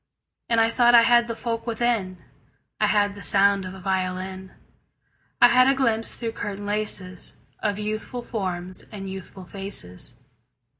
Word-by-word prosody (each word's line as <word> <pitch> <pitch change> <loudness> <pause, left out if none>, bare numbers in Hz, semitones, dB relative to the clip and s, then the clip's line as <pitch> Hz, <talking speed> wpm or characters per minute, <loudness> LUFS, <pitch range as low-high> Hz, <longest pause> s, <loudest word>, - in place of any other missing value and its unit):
And 230 -1 +3
I 225 0 +3
thought 240 0 +5
I 230 - +8
had 235 0 +4
the 230 - -4
folk 230 0 -4
within: 225 -5 -1 0.6
I - - +3
had 205 -1 +2
the 200 - -11
sound 200 -1 +4
of 185 +1 -7
a - - -10
violin; 185 0 -3 0.9
I 245 - +8
had 255 +2 +5
a 275 - +3
glimpse 230 -4 +1
through 230 -2 -4
curtain 205 -2 -6
laces 205 -3 -2 0.3
Of 205 -2 -1
youthful 215 +3 -4
forms 185 -5 -4
and 195 -3 -7
youthful 190 0 -9
faces. 150 - -4
205 Hz, 155 wpm, -24 LUFS, 190-230 Hz, 0.9 s, I